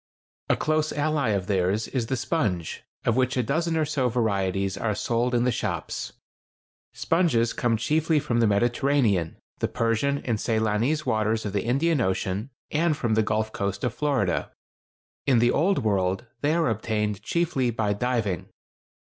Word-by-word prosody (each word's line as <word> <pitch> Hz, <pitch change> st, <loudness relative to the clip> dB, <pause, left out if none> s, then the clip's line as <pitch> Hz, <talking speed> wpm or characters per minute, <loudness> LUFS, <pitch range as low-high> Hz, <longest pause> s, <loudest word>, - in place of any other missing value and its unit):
A -, -, +3 dB
close 155 Hz, 0 st, 0 dB
ally 145 Hz, -4 st, 0 dB
of 100 Hz, -3 st, 0 dB
theirs 100 Hz, +2 st, 0 dB
is 120 Hz, -4 st, -2 dB
the 130 Hz, -, -1 dB
sponge, 100 Hz, -, -1 dB, 0.2 s
of 115 Hz, -, +2 dB
which 130 Hz, +1 st, +1 dB
a 125 Hz, -, +2 dB
dozen 165 Hz, +6 st, 0 dB
or 155 Hz, -, +2 dB
so 140 Hz, -4 st, 0 dB
varieties 100 Hz, -5 st, 0 dB
are 105 Hz, -3 st, -1 dB
sold 120 Hz, +3 st, 0 dB
in 120 Hz, -, +2 dB
the 125 Hz, -, +2 dB
shops. -, -, -3 dB, 0.8 s
Sponges 160 Hz, -10 st, +1 dB
come 115 Hz, -2 st, +1 dB
chiefly 155 Hz, +6 st, +1 dB
from 120 Hz, -5 st, -1 dB
the 115 Hz, -, +4 dB
Mediterranean, 120 Hz, -, +1 dB, 0.2 s
the -, -, +1 dB
Persian 115 Hz, +4 st, 0 dB
and 115 Hz, -4 st, 0 dB
Ceylonese 110 Hz, +8 st, 0 dB
waters 110 Hz, +1 st, 0 dB
of 100 Hz, -, -3 dB
the 100 Hz, -, -1 dB
Indian 140 Hz, +4 st, +2 dB
Ocean, 95 Hz, +3 st, -1 dB, 0.2 s
and 155 Hz, 0 st, +1 dB
from 120 Hz, -7 st, 0 dB
the 110 Hz, -, +3 dB
Gulf 110 Hz, 0 st, -1 dB
coast 100 Hz, 0 st, -3 dB
of 125 Hz, -, 0 dB
Florida. 135 Hz, -11 st, 0 dB, 0.8 s
In 130 Hz, -3 st, +5 dB
the 120 Hz, +1 st, +4 dB
Old 185 Hz, -, +2 dB
World 95 Hz, +1 st, 0 dB, 0.2 s
they 150 Hz, +2 st, +2 dB
are 170 Hz, -1 st, +2 dB
obtained 105 Hz, -2 st, -1 dB
chiefly 150 Hz, -2 st, 0 dB
by 110 Hz, -3 st, 0 dB
diving. 105 Hz, -5 st, -1 dB
115 Hz, 165 wpm, -25 LUFS, 105-140 Hz, 0.8 s, In